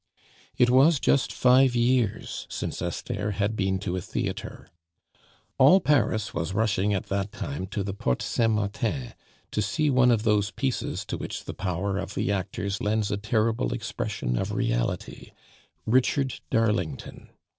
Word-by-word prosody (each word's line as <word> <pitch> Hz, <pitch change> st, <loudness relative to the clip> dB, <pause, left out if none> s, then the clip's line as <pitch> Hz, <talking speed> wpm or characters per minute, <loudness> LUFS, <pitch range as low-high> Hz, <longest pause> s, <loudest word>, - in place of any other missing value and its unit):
It 125 Hz, 0 st, +4 dB
was 140 Hz, +4 st, +5 dB
just 140 Hz, 0 st, +2 dB
five 130 Hz, 0 st, +4 dB
years 120 Hz, -3 st, 0 dB
since -, -, -4 dB
Esther 105 Hz, -, -3 dB
had 100 Hz, +3 st, -1 dB
been 95 Hz, -2 st, 0 dB
to 90 Hz, -2 st, -2 dB
a 90 Hz, -, -2 dB
theatre. -, -, -5 dB, 0.9 s
All 145 Hz, +9 st, +7 dB
Paris 125 Hz, -, +1 dB
was 85 Hz, +3 st, -3 dB
rushing 105 Hz, -2 st, +1 dB
at 95 Hz, -2 st, -1 dB
that 100 Hz, +1 st, -1 dB
time 110 Hz, -2 st, -5 dB
to 100 Hz, 0 st, -3 dB
the 95 Hz, 0 st, -4 dB
Porte 65 Hz, -10 st, -1 dB
Saint 115 Hz, -2 st, +1 dB
Martin, 110 Hz, +4 st, -2 dB, 0.4 s
to 105 Hz, -, 0 dB
see 145 Hz, +9 st, +1 dB
one 125 Hz, -1 st, +5 dB
of 115 Hz, -3 st, +3 dB
those 105 Hz, -2 st, +2 dB
pieces 130 Hz, +3 st, -2 dB
to -, -, -4 dB
which -, -, -5 dB
the -, -, -5 dB
power 95 Hz, +2 st, -2 dB
of 100 Hz, -, -6 dB
the -, -, 0 dB
actors 100 Hz, +1 st, -3 dB
lends 105 Hz, 0 st, 0 dB
a 105 Hz, -, 0 dB
terrible 110 Hz, -, 0 dB
expression -, -, -3 dB
of -, -, -2 dB
reality, -, -, -2 dB, 0.5 s
Richard 130 Hz, +2 st, +1 dB
Darlington. 105 Hz, -10 st, -1 dB
105 Hz, 155 wpm, -26 LUFS, 100-125 Hz, 0.9 s, All